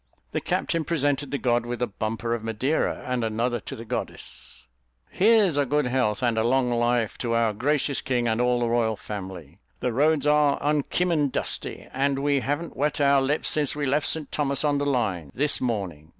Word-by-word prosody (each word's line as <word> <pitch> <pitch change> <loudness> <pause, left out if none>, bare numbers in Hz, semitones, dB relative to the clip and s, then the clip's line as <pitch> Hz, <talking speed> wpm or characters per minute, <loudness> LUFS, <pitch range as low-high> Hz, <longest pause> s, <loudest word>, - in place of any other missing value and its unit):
The - - -2
captain 165 -1 -1
presented 145 -3 0
the 140 - -2
god 120 -3 +1
with 120 0 -5
a 125 - +1
bumper 115 +2 -3
of 115 -2 -3
Madeira, 115 +7 -1
and 125 -2 -1
another 115 +2 -1
to - - -8
the 115 - -9
goddess. - - -5 0.5
"Here's 200 -6 +4
a 145 - +2
good 150 +2 +1
health 125 -3 0
and 115 -2 +2
a - - +2
long 125 +1 +2
life 120 -2 0
to 115 -2 -1
our 115 -2 +2
gracious 140 +4 0
king 120 -2 0
and 115 +1 +1
all 125 0 +2
the 120 - +1
royal 115 -1 +1
family. 95 -8 -8 0.2
The 125 - -1
roads 150 +3 +2
are 150 -1 +4
unkimmon 150 +1 +1
dusty, - - -3
and 135 +1 +1
we 140 0 +1
hav'n't 145 +5 -3
wet 150 +1 -1
our 140 -1 +4
lips 145 +3 +2
since 150 -3 +2
we 145 -1 -2
left 145 +3 +1
St 155 -3 -2
Thomas 140 -1 0
on 145 -1 +2
the 145 - -1
line, 100 - -1
this 150 +2 +1
morning. 95 - -3
130 Hz, 195 wpm, -25 LUFS, 115-145 Hz, 0.5 s, Here's